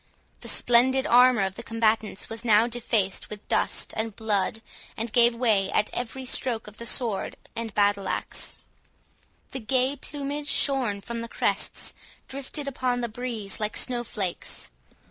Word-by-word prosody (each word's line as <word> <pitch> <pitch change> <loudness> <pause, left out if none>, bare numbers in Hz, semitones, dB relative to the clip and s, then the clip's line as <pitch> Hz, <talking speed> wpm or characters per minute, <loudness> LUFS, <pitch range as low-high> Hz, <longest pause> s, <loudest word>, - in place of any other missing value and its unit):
The - - -10
splendid 260 +2 +4
armour 245 -3 +6
of 190 -1 -1
the 235 - -8
combatants 225 -3 0
was 225 +1 -7
now 220 -1 +5
defaced 225 -5 -1
with 210 -1 -8
dust - - 0
and 220 -1 -2
blood, 220 0 0 0.3
and 225 0 -3
gave 235 -1 +5
way 215 -5 +2
at 210 - +1
every 250 +2 -4
stroke 245 -3 0
of 210 0 -12
the 235 - -5
sword 225 -4 0 0.2
and 230 -1 -4
battle 205 -1 +3
axe. - - -2 1.0
The 265 - -4
gay 260 +3 +1
plumage, 290 +1 -5
shorn 250 -8 +2
from 230 +2 -5
the 230 - -6
crests, - - 0 0.3
drifted 275 +2 -4
upon 250 -2 0
the 235 - -2
breeze 225 -4 -4
like 210 0 -2
snow 245 -2 -1
flakes. 195 -6 -4
230 Hz, 155 wpm, -26 LUFS, 215-250 Hz, 1.0 s, armour